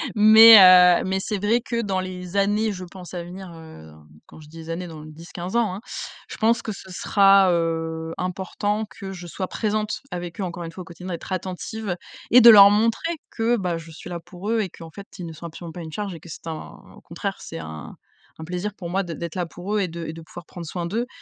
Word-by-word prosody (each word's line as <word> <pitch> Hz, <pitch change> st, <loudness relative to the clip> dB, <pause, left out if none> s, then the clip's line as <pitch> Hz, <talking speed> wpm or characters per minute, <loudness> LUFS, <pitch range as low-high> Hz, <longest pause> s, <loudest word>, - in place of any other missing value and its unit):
mais 220 Hz, +2 st, +9 dB
heu, 180 Hz, -2 st, +8 dB
mais 190 Hz, 0 st, -1 dB
c'est 205 Hz, +1 st, -3 dB
vrai 230 Hz, +3 st, +2 dB
que 235 Hz, -1 st, -2 dB
dans 195 Hz, -4 st, -1 dB
les 185 Hz, 0 st, -6 dB
années, 210 Hz, +2 st, +1 dB
je 185 Hz, -2 st, -7 dB
pense 180 Hz, 0 st, -11 dB
à 175 Hz, -, -4 dB
venir, 180 Hz, +1 st, -9 dB
heu, 160 Hz, -, -13 dB, 0.4 s
quand -, -, -15 dB
je 150 Hz, -, -14 dB
dis 160 Hz, +2 st, -14 dB
des 165 Hz, 0 st, -10 dB
années 170 Hz, +2 st, -4 dB
dans 160 Hz, -2 st, -10 dB
10-15 170 Hz, +5 st, -8 dB
ans, 225 Hz, -6 st, +1 dB
hein, -, -, -7 dB, 0.5 s
je -, -, -8 dB
pense 230 Hz, +1 st, +2 dB
que 220 Hz, -, -5 dB
ce 190 Hz, -2 st, -10 dB
sera, 195 Hz, +1 st, +4 dB
heu, 165 Hz, -1 st, -2 dB
important 205 Hz, +4 st, -2 dB
que 195 Hz, 0 st, -9 dB
je 180 Hz, -2 st, -9 dB
sois 185 Hz, +2 st, -5 dB
présente 215 Hz, 0 st, -2 dB
avec 175 Hz, 0 st, -6 dB
eux -, -, -1 dB
encore 175 Hz, -1 st, -5 dB
1 165 Hz, -, -7 dB
fois 185 Hz, +2 st, -9 dB
au -, -, -18 dB
quotidien, 180 Hz, +2 st, -10 dB
d'être 170 Hz, -, -7 dB
attentive 185 Hz, +2 st, -4 dB, 0.3 s
et 250 Hz, -, +8 dB
de 235 Hz, -, +10 dB
leur 200 Hz, -2 st, +10 dB
montrer 230 Hz, +11 st, +1 dB, 0.2 s
que, 230 Hz, +1 st, +1 dB
bah, 180 Hz, -5 st, -2 dB
je 165 Hz, 0 st, -12 dB
suis 160 Hz, +2 st, -10 dB
là 170 Hz, -, -4 dB
pour 180 Hz, +5 st, -7 dB
eux 230 Hz, -, +2 dB
et 195 Hz, -, -3 dB
qu'en 165 Hz, -1 st, -12 dB
fait, 200 Hz, +4 st, -11 dB
ils 180 Hz, -, -6 dB
ne 165 Hz, -, -7 dB
sont 170 Hz, +2 st, -8 dB
absolument 170 Hz, +1 st, -9 dB
pas 175 Hz, -, -8 dB
une 160 Hz, -1 st, -8 dB
charge 200 Hz, +3 st, -4 dB
et 165 Hz, -, -9 dB
que 170 Hz, +2 st, -14 dB
c'est 160 Hz, -, -10 dB
un 160 Hz, -2 st, -7 dB, 0.2 s
au -, -, -16 dB
contraire, -, -, -5 dB
c'est -, -, -8 dB
un 80 Hz, -1 st, -9 dB, 0.4 s
un -, -, -7 dB
plaisir 180 Hz, +5 st, -4 dB
pour 175 Hz, -5 st, -7 dB
moi 195 Hz, +2 st, +1 dB
d 170 Hz, -4 st, -6 dB
d'être 170 Hz, 0 st, -6 dB
là 180 Hz, -2 st, -3 dB
pour 180 Hz, +5 st, -5 dB
eux -, -, +2 dB
et 185 Hz, -, 0 dB
de 170 Hz, 0 st, -7 dB
et 160 Hz, -, -5 dB
de 165 Hz, -, -10 dB
pouvoir 175 Hz, +1 st, -12 dB
prendre 170 Hz, -1 st, -9 dB
soin 175 Hz, +2 st, -4 dB
d'eux, 230 Hz, +7 st, -2 dB
180 Hz, 250 wpm, -23 LUFS, 170-205 Hz, 0.5 s, de